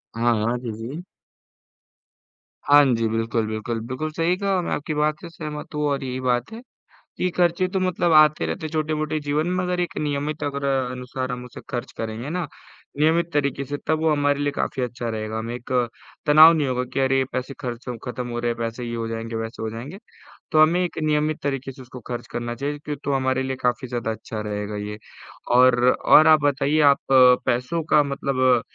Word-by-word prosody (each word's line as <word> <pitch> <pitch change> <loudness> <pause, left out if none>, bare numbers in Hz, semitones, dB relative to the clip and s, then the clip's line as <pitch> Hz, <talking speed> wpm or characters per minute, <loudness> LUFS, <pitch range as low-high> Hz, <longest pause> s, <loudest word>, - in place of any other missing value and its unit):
हाँ, 120 +1 +2
हाँ, 120 +2 0
जी, 120 -2 -5
जी। 125 +11 -7 1.6
हाँ 145 0 +8
जी, 115 0 0
बिल्कुल, 115 0 -1
बिल्कुल, 110 +2 -3
बिल्कुल, 145 +5 -3
सही 165 +3 +1
कहा 200 +1 -1
और 180 - 0
मैं - - -4
आपकी 150 +1 -2
बात 150 0 0
से 170 - -8
सहमत 150 -2 -7
हूँ 150 - -1
और 140 -1 -1
यही 130 0 -4
बात 125 - 0
है 230 - -8 0.6
कि 180 - +1
ख़र्चे 175 +1 +2
तो 190 0 -1
मतलब 180 -2 +1
आते 155 -1 +5
रहते 160 - -4
हैं - - -7
छोटे-मोटे 155 0 -1
जीवन 145 +2 -1
में, 185 +1 0
मगर 180 0 -1
एक 175 - -3
नियमित 150 +1 -2
अगर 140 -1 -3
अ, 135 -2 0
अनुसार 125 0 -5
हम 125 0 -5
उसे 125 - -10
ख़र्च 120 +1 -4
करेंगे 115 +3 -4
ना, 175 0 -2 0.5
नियमित 165 +2 +3
तरीके 140 -2 0
से 145 +2 -4
तब 155 0 +1
वो 160 0 +2
हमारे 145 -1 +1
लिए 145 0 0
काफ़ी 135 -1 -2
अच्छा 120 -1 -4
रहेगा। 110 0 -3
हमें 115 +2 -4
एक 120 0 -10 0.6
तनाव 155 +2 +9
नहीं 155 -3 +1
होगा 125 0 -1
कि - - 0
अरे, 135 0 +3
पैसे 130 +2 -3
ख़र्च 125 -1 -6
हो 125 - -3
खत्म 125 0 -4
हो 120 0 -4
रहे 120 0 0
है - - -1
पैसे, 115 +1 -4
ये 120 0 -4
हो 115 -1 -3
जाएँगे, 115 0 -4
वैसे 115 0 -5
हो 110 - -2
जाएँगे, 135 - -8 0.5
तो 155 - +5
हमें 165 +3 +4
एक 175 - -4
नियमित 155 0 +1
तरीके 135 -1 -2
से 130 0 -13
उसको 125 0 -10
ख़र्च 120 -1 -5
करना 120 0 -4
चाहिए, 145 +4 -3
कि 150 -1 -3
तो 140 - 0
हमारे 130 0 +1
लिए 130 0 -2
काफ़ी 125 +1 0
ज़्यादा 120 -2 -2
अच्छा 110 0 -6
रहेगा 105 0 -4
ये। 105 - -6 0.6
और 125 -1 +5
और 155 - +6
आप 155 -1 +6
बताइए 145 +2 +2
आप 140 - 0
अ, 125 -1 +8
पैसों 125 +7 0
का 150 - +6
मतलब 140 -2 -2 0.2
अ, - - -8
135 Hz, 215 wpm, -23 LUFS, 120-155 Hz, 1.6 s, तनाव